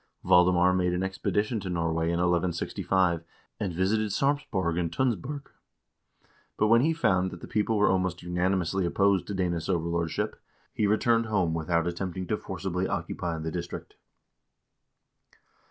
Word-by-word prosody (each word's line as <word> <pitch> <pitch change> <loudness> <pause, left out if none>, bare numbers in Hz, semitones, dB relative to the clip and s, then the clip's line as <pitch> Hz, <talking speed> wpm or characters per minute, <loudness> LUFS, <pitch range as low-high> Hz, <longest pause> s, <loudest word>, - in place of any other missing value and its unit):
Valdemar 90 +1 +5
made 90 -1 +1
an 90 +1 -1
expedition 105 +4 -1
to 95 -2 -6
Norway 85 -2 0
in 85 - 0
1165, 85 0 +1 0.4
and 95 - -2
visited 100 +5 +1
Sarpsborg 100 - 0
and 85 -2 -1
Tunsberg, 130 - -2 1.1
but 105 - +2
when 115 +1 +6
he 160 +5 +3
found 95 - +2
that - - -9
the - - -9
people 105 +1 0
were 105 - +4
almost 95 -2 -1
unanimously 90 +1 0
opposed 95 +1 +2
to 100 - -4
Danish 85 -3 -1
overlordship, 85 -2 -1 0.3
he 105 - +1
returned 115 +2 +2
home 95 -7 +1
without 85 0 0
attempting 90 +1 -3
to 105 - -1
forcibly 95 -1 -3
occupy 85 -2 -3
the 80 0 -4
district. 85 0 -6
90 Hz, 140 wpm, -28 LUFS, 85-105 Hz, 1.1 s, when